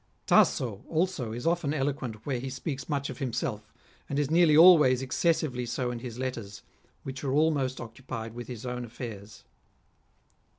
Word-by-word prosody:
Tasso 110 -6 +3
also 165 -8 -1
is 120 +2 -6
often 165 -3 +1
eloquent 130 -6 -3
where 135 -4 -1
he 130 +2 -5
speaks 135 +1 -5
much 140 -2 -1
of - - -10
himself, 120 -5 -3 0.4
and 140 - -2
is 145 0 0
nearly 165 -2 +5
always 155 -7 +7
exces 165 +6 +2
sively 125 -6 -3
so 125 +1 -2
in 120 - -5
his 120 -1 -7
letters, 115 -6 -5 0.4
which 135 +1 -7
are 135 - -1
almost 145 -4 +1
occupied 115 -1 -7
with 120 0 -7
his 120 -2 -7
own 125 0 -3
affairs. 110 -3 -8
130 Hz, 165 wpm, -28 LUFS, 120-145 Hz, 0.4 s, always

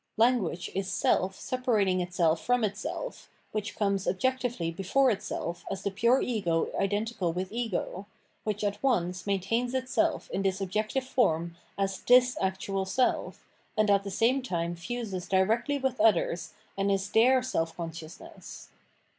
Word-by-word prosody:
Language 225 -7 +2
is 195 0 -2
seK 190 -1 +2
separating 210 -6 0
itself 175 -2 +1
from 245 -1 +2
itself, 215 - -4 0.2
which 210 -1 -3
comes 200 -2 0
objectively 245 -5 0
before 220 +10 +2
itself 175 -4 -4
as 195 0 -4
the 200 - -1
pure 235 +6 +3
ego 175 -9 0
identical 205 -2 0
with 185 +2 -4
ego, 210 -4 -3 0.4
which 210 -1 -2
at 205 0 -1
once 185 -8 0
maintains 230 +6 0
itself 260 +5 0
in - - -1
this 195 0 0
objective 215 +7 -1
form 170 - +1 0.2
as 195 -1 -1
this 250 0 +5
actual 190 +1 -1
self, 250 +7 0 0.3
and 215 -1 +4
at 200 0 +4
the 200 - -5
same 235 +7 +2
time 175 -8 -2
fuses 195 -1 -5
directly 220 +9 +2
with 265 -4 -1
others 185 -5 +2 0.2
and 195 0 +1
is 195 0 0
their 250 +3 +5
self 165 -10 -2
consciousness. 165 -1 -9
200 Hz, 145 wpm, -29 LUFS, 185-245 Hz, 0.4 s, this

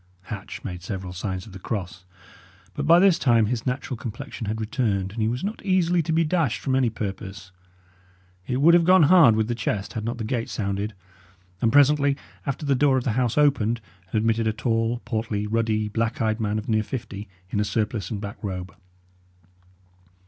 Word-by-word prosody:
Hatch 100 0 -7
made 90 -3 -6
several 95 0 -5
signs 95 0 -4
of 110 - -12
the 95 - -9
cross; 90 -4 -5 0.7
but 145 0 -3
by 170 +1 +8
this 185 -1 +5
time 115 -4 +4
his 115 +3 -2
natural 125 0 -2
complexion 115 -1 -6
had 110 +1 -2
returned, 105 -4 -1
and 110 +2 -4
he 110 - +2
was 120 +3 -2
not 210 +3 -4
easily 180 -3 +2
to 160 - -3
be 165 +1 +3
dashed 155 -6 +1
from 135 - -2
any 130 -2 +3
purpose. 95 -3 -6 1.0
It 130 +1 -1
would 170 +3 +7
have 175 0 +6
gone 185 0 +6
hard 160 -7 +7
with 110 0 +1
the 120 - -1
chest 110 -3 -3
had 110 - -4
not 120 +2 -3
the 115 - -4
gate 115 +1 -2
sounded, 100 0 -3 0.7
and 115 - +3
presently 145 0 +4 0.3
after 140 +3 -3
the 140 - +3
door 135 0 +3
of 130 - -1
the 120 - 0
house 125 +2 0
opened 120 -6 +3 0.3
and - - 0
admitted 115 +1 +1
a 110 - +1
tall, 115 +1 -1
portly, 110 -3 -2
ruddy, 110 -1 0
black 115 +2 -1
eyed 110 0 0
man 105 -1 -1
of 110 - -5
near 110 -1 +2
fifty, 105 -3 -6 0.2
in 105 - 0
a - - +3
surplice 105 -2 -2
and 105 - -3
black 100 -1 -8
robe. 90 -3 -5
115 Hz, 200 wpm, -24 LUFS, 105-130 Hz, 1.0 s, by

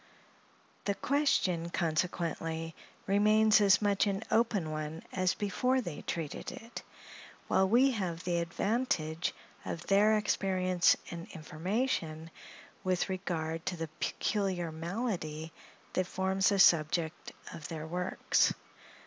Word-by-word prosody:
The 200 - 0
question, 195 - +1
consequently, 165 -1 -2 0.3
remains 215 +2 +5
as 200 +1 +5
much 200 0 +2
an 200 +1 -1
open 210 -8 +2
one 155 +1 -5
as 185 -1 +1
before 250 +6 +1
they 175 -11 -5
treated 160 -4 -4
it; 230 +1 -9 0.7
while 190 0 +3
we 255 +5 +5
have 180 -7 -3
the 175 -1 0
advantage 170 -3 -1 0.3
of 170 - -5
their 210 +2 +4
experience 185 -4 +2
and 170 0 -7
information, 165 0 -2 0.5
with 185 0 0
regard 165 -4 -3
to 180 - -1
the 165 -1 -4
peculiar 185 -5 -1
malady 165 -3 -4 0.4
that 185 -1 0
forms 190 +1 +1
the 200 - +1
subject 165 -2 +3 0.2
of 155 - -7
their 160 -1 -5
works. 180 +3 +1
180 Hz, 115 wpm, -31 LUFS, 165-205 Hz, 0.7 s, remains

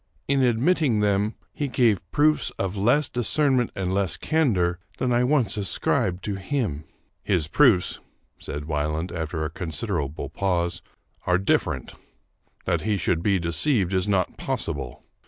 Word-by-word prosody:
In 140 0 +2
admitting 125 0 +2
them, 105 +1 +1 0.2
he 145 - -2
gave 115 -7 +2
proofs 150 +5 +2
of 95 0 -2
less 120 +9 +3
discernment 125 +1 +1
and 95 -1 -2
less 95 -4 0
candor 95 - +1 0.2
than 125 - 0
I 120 +1 +3
once 125 -4 +1
ascribed 95 -2 0
to 100 -2 -3
him." 95 - -2 0.2
" - - -45
His 85 -6 +3
proofs," 105 - +3 0.4
said 75 0 -6
Wieland, 75 +3 -2
after 80 -1 -3
a 80 - -4
considerable 80 - -4
pause, 85 -3 -1 0.2
" - - -33
are 90 0 +4
different. 95 - 0 0.7
That - - 0
he 105 -1 0
should 85 -1 0
be 100 +1 +2
deceived 95 - +1
is 95 +1 +1
not 95 -3 0
possible. 60 - -4
100 Hz, 150 wpm, -24 LUFS, 85-125 Hz, 0.7 s, are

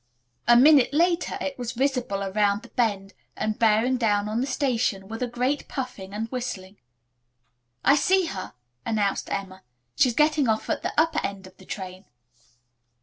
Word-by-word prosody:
A 240 0 +7
minute 280 0 +6
later 345 +2 +1
it 280 -2 -4
was 240 -1 -4
visible 250 -6 -1
around 200 +1 +1
the - - -13
bend 200 -5 -1 0.2
and 215 0 -2
bearing 230 +3 +3
down 210 -3 +1
on 220 +3 -1
the 265 - -1
station 240 -7 -1
with 225 +3 -7
a 250 - 0
great 250 +4 -1
puffing 250 -8 -6
and 215 +2 -3
whistling. 210 -6 -5 1.1
"I 280 - +6
see 375 +5 +3
her," 185 - -6 0.3
announced 205 -3 -1
Emma. 190 -1 -4 0.3
"She's 245 -3 +3
getting 300 -2 +3
off 220 0 0
at - - -1
the - - -2
upper 325 +1 +2
end 195 -1 -4
of 185 - -15
the 190 - -16
train." 185 0 -7
230 Hz, 165 wpm, -25 LUFS, 200-265 Hz, 1.1 s, A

